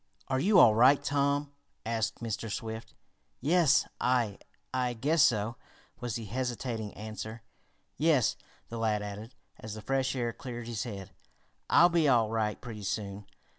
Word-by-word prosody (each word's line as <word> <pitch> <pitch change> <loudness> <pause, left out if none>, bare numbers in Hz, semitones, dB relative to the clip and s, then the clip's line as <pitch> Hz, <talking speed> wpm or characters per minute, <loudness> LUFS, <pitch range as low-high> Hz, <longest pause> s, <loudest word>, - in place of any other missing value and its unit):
"Are 130 0 +1
you 195 +7 +4
all 110 - +8
right, 130 +6 +5
Tom?" 140 0 0 0.3
asked 115 0 -2
Mr. 110 -1 -3
Swift. 110 +2 -6 0.4
"Yes 160 +2 +4
I 120 -5 +1 0.3
I 125 -1 0
guess 145 +8 +2
so," 115 -3 +2 0.4
was 120 -2 -3
the 115 - -4
hesitating 120 -1 -3
answer. 110 +1 -7 0.5
"Yes," 150 -6 +3 0.3
the 115 - -5
lad 105 -2 0
added, 105 +3 -7 0.2
as 110 -1 -7
the 110 - -7
fresh 135 0 0
air 120 -2 -1
cleared 120 -1 -7
his 115 +1 -3
head. 100 -4 -7 0.6
"I'll 175 - +7
be 170 -3 +3
all 115 -5 +3
right 110 -2 -1
pretty 110 -4 -8
soon. 100 0 -4
115 Hz, 150 wpm, -30 LUFS, 110-130 Hz, 0.6 s, all